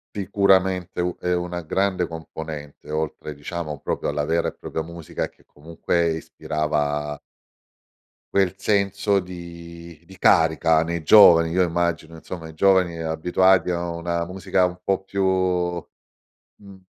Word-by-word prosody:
Sicuramente 95 -2 +1
u 90 0 -1
è 90 - -1
una 90 0 -3
grande 95 +2 0
componente 80 -3 -8
oltre, 75 -1 -4
diciamo, 75 +1 -5
proprio - - -2
alla 75 0 -1
vera 85 +2 +1
e - - -4
propria 80 - -4
musica 85 0 -5
che - - -28
comunque 85 +2 -2
ispirava 75 -2 -2 1.1
quel 95 -2 +2
senso 100 0 +1
di 85 -2 -10
di 95 +2 -15
carica 80 -2 +4
nei 85 0 -3
giovani, 85 -1 +7
io 90 +2 +2
immagino, 85 -1 -1
insomma, 80 0 -8
i - - -11
giovani 90 0 +3
abituati 90 +3 +2
a 85 -1 -2
una 85 0 -2
musica 90 +1 0
un 90 0 -3
po' 95 0 0
più, 100 0 -3 1.3
mhmm 100 -2 -15
85 Hz, 130 wpm, -23 LUFS, 80-95 Hz, 1.3 s, giovani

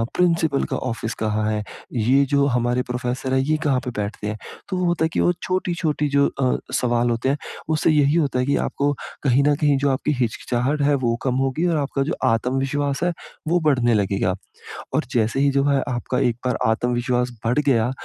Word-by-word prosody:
Principal 165 -5 +2
का - - 0
office 115 -2 -3
कहाँ 110 0 0
है? 105 -1 -1 0.3
ये 130 +4 +3
जो 140 0 +4
हमारे 125 -1 +1
प्रोफ़ेसर 125 +1 -2
हैं 130 - +3
ये 145 +4 +1
कहाँ 135 -4 +2
पे 125 - -3
बैठते 105 0 -3
हैं? 105 +1 -3 0.3
तो 185 - -2
वो 180 - 0
होता 175 -2 +1
है - - 0
कि, - - 0
वो - - +4
छोटी-छोटी 170 -5 -1
जो 140 0 +3
अ, 130 -1 +2 0.2
सवाल 120 -1 +1
होते 120 +3 0
हैं 140 - +1 0.4
उससे 155 - +2
यही 145 0 +3
होता 140 -6 +1
है 125 - +1
कि 140 - +2
आपको 145 +1 0 0.3
कहीं 135 0 +3
न 145 - +4
कहीं 145 -1 +2
जो 140 +1 +2
आपकी 135 +3 -1
हिचकिचाहट 125 +4 -1
है, 145 0 +3
वो 120 -4 0
कम 130 -2 0
होगी 135 +5 0
और 165 -2 +1
आपका 140 -1 -1
जो 150 - -2
आत्मविश्वास 135 +5 0
है 175 - +2 0.4
वो 175 +2 +3
बढ़ने 125 -5 +3
लगेगा। 95 -3 +1 0.6
और - - +1
जैसे 115 +2 +1
ही 140 - +4
जो 140 0 +2
है 140 -1 +3
आपका 125 +1 -2
एक 120 -4 +1
बार 125 - +1
आत्मविश्वास 125 +2 0
बढ़ 120 +5 +2
गया, 125 -5 +2
130 Hz, 205 wpm, -22 LUFS, 120-145 Hz, 0.6 s, जो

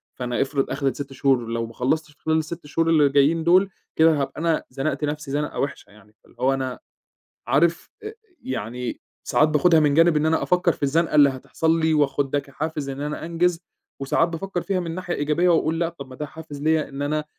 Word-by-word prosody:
فأنا 125 -1 -2
إفرِض 135 0 -1
أخدْت 135 0 -1
6 140 -1 -6
شهور 135 -3 +1
لو 115 0 -2
ما 115 - -11
خلّصتش 150 +6 -1
في - - -39
خلال 160 0 +2
ال6 160 +1 -4
شهور 165 +3 0
اللي 150 -3 +4
جايّين 145 +4 +3
دُول 185 +4 +4 0.3
كده 160 -2 +4
هابقى 140 - -4
أنا 165 -1 +1
زنَقت 135 +4 -3
نَفسي 150 -1 -3
زنقة 145 +1 -2
وِحشة 140 - -3
يعني، 105 0 -20
فاللي - - -23
هو 130 +2 +2
أنا 130 -2 -3 0.7
عارف 165 +4 +2
أ - - -5
أ 435 - -7 0.3
يعني 125 - -5 0.2
ساعات 155 - +3
باخدها 160 +2 +4
من 150 -2 +3
جانب 165 +1 +5
إن 150 - +1
أنا 160 0 +2
أفكّر 180 -1 +2
في - - -8
الزنقة 155 +3 +1
اللي 145 -2 +7
هتحصَل 160 +5 -1
لي 160 0 +2
وآخُد 140 -2 +1
ده 145 - +2
كحافز 145 +1 -5
إن 135 +1 -5
أنا 150 +2 -4
أنجِز 170 +1 0 0.4
وساعات 140 +5 +1
بافكّر 175 +2 -4
فيها 195 0 -1
من 165 -2 -4
ناحية 180 -1 -4
إيجابية 150 +5 +1
وأقول 165 -1 +2
لأ، 170 -1 +1
طَب 145 -5 -10
ما 130 - -10
ده 150 - -4
حافز 150 -1 -10
ليَّ 155 0 +1
إن 140 +1 -7
أنا 150 +1 -1
150 Hz, 215 wpm, -23 LUFS, 140-165 Hz, 0.7 s, اللي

